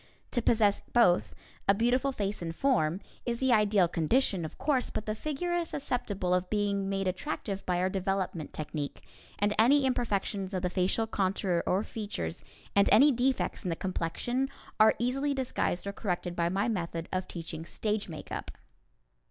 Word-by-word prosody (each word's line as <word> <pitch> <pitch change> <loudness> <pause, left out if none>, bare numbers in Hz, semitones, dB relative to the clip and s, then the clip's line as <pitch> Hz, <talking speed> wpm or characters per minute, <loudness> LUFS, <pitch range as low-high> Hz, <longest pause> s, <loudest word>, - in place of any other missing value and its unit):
To 240 - +1
possess 215 -3 +3
both, 185 -8 +4 0.3
a 200 - +5
beautiful 250 +5 +2
face 205 -6 -3
and 165 -1 -4
form, 190 - +2 0.2
is 235 -1 -1
the 260 -2 +3
ideal 210 -4 +4
condition, 180 - +1
of 155 - -7
course, 275 -4 +1
but 215 - -4
the 215 - -1
figure 305 +8 -3
is 345 -1 0
susceptible 205 -9 -1
of 180 0 +1
being 200 -2 0
made 195 -1 -1
attractive 195 0 -3
by 180 -1 +1
our 180 +1 +2
development 190 -4 -2
technique, 150 -1 -5 0.3
and 205 +1 +2
any 270 +5 +5
imperfections 200 -6 -1
of 185 - -2
the 180 - 0
facial 185 +5 +1
contour 190 -4 0
or 190 +3 +2
features, 200 - -5 0.3
and 200 0 +5
any 275 +8 +7
defects 255 0 0
in 185 - -2
the 165 - 0
complexion, 215 +10 -2 0.3
are 215 +1 +7
easily 275 +4 0
disguised 250 -8 -1
or 200 - -3
corrected 180 -3 -3
by 170 0 +1
my 195 +5 0
method 170 -6 -2
of 185 0 -1
teaching 165 -2 -6
stage 210 +3 -2
makeup. 155 - -6
200 Hz, 170 wpm, -30 LUFS, 180-240 Hz, 0.3 s, any